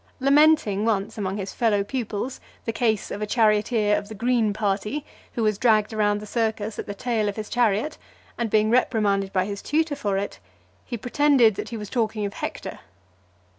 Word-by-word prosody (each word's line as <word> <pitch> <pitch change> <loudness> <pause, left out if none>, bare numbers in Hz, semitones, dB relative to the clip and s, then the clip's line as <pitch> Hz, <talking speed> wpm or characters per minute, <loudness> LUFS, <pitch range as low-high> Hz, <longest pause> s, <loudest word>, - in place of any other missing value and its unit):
Lamenting 275 -7 +4
once, 215 -1 0
among 195 0 -2
his 195 -1 -5
fellow 215 -4 +2
pupils, 240 +1 -4 0.3
the 225 - -2
case 220 -3 0
of 205 - -5
a 210 - -2
charioteer 215 -1 +2
of 205 - -4
the 220 - -7
green 235 -1 +1
party, 210 +6 -2 0.3
who 230 - -1
was 215 -2 +1
dragged 220 -2 +3
round 205 -1 +1
the 210 - -8
circus 220 -1 -2
at - - -5
the 205 - -5
tail 220 -2 0
of 200 - -5
his 215 -1 -6
chariot, 240 +5 +1 0.4
and 235 -2 -2
being 215 +1 +3
reprimanded 205 -5 +2
by 185 -1 +1
his 200 0 -5
tutor 310 0 0
for 200 -6 -1
it, 200 +1 -4 0.5
he 240 - -4
pretended 250 -1 +4
that 205 - -6
he 230 - -5
was 210 -1 -6
talking 220 -3 -1
of 200 - -4
Hector. - - -5
215 Hz, 190 wpm, -24 LUFS, 205-240 Hz, 0.5 s, Lamenting